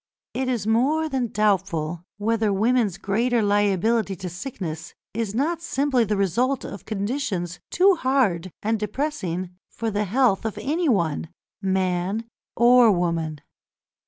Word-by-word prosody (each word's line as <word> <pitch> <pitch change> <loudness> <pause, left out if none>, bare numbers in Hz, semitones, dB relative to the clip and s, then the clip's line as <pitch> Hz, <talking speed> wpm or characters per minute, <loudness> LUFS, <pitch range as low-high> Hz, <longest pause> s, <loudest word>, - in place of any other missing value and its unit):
It 260 0 -1
is 235 -5 -1
more 270 +9 +2
than 265 -5 -1
doubtful 190 -6 0
whether 220 0 +1
women's 215 -1 +2
greater 230 +4 +1
liability 205 +1 +2
to 180 +1 -6
sickness 175 - -6 0.2
is 220 -1 -2
not 320 +6 0
simply 275 -6 +1
the 210 0 -1
result 235 +8 +1
of 200 -1 -8
conditions 200 - -2
too 385 +2 +5
hard 235 - +1
and 220 +1 0
depressing 200 - -3 0.2
for 225 -1 -3
the 210 +1 0
health 220 -1 +2
of 220 -2 -3
anyone, 230 - 0 0.3
man 190 +2 0 0.3
or 240 -1 +6
woman. 165 -4 -1
210 Hz, 130 wpm, -24 LUFS, 185-250 Hz, 0.3 s, or